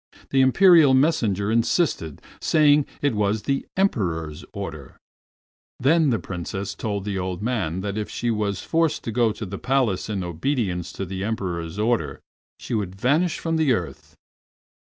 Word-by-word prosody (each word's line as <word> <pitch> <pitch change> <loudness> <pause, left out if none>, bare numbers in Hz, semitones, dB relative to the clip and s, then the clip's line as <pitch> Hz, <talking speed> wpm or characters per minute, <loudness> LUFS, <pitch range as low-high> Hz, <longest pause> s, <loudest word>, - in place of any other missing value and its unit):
The 135 - +4
Imperial 155 0 +6
messenger 110 - +2
insisted, 115 - 0 0.2
saying 150 -2 +4 0.2
it 145 - +2
was 105 0 0
the 135 -1 -1
Emperor's 85 - -1
order. - - -7 0.8
Then 155 +3 +3
Princess 95 +2 -4
Moonlight - - -33
told 100 -3 -3
the 100 -2 -2
old 90 +1 -4
man 95 -8 -1
that 100 +1 -3
if 105 - -4
she 120 0 -2
was 105 -3 -2
forced 165 -1 0
to 115 - -3
go 115 0 +2
to 105 +1 -6
the 100 +1 -6
Palace 125 -8 0
in 100 -3 -2
obedience 90 - -2
to 95 - -4
the 95 +1 -5
Emperor's 90 -6 -3
order, 105 - 0 0.4
she - - -7
would 100 -4 -2
vanish 150 - +1
from 165 -1 -1
the 155 -5 +3
earth. 75 - -5
105 Hz, 160 wpm, -23 LUFS, 95-135 Hz, 0.8 s, Imperial